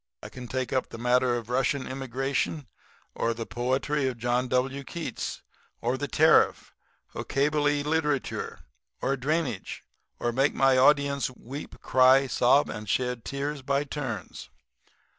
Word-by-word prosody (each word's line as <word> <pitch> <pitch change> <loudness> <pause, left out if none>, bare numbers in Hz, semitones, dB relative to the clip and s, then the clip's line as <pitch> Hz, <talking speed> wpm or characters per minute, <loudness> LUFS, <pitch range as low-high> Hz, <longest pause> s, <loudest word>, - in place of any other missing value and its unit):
I - - -7
can 125 -1 -9
take 130 +2 -3
up 130 - 0
the - - -8
matter 125 +1 +2
of 115 -2 -4
Russian 130 +1 +1
immigration, 135 +3 -2 0.5
or 115 0 -1
the 115 0 -5
poetry 130 +4 -1
of 130 -2 -3
John 120 +2 0
W. 135 +2 0
Keats, 170 +4 -5 0.4
or - - 0
the - - -3
tariff, - - +3 0.4
or - - -4
Kabyle 145 +1 +1
literature, 150 -2 -1 0.4
or 135 - 0
drainage, 135 - -2 0.4
and 120 -1 -1
make 135 +2 +2
my 135 -1 +4
audience 140 +1 +3
weep, 130 +3 -9
cry, 130 +1 +5
sob 135 +2 +3
and 105 0 -6
shed 125 -1 -1
tears 140 +1 -3
by 140 +1 0
turns.' 115 - -6
130 Hz, 140 wpm, -27 LUFS, 125-140 Hz, 0.5 s, cry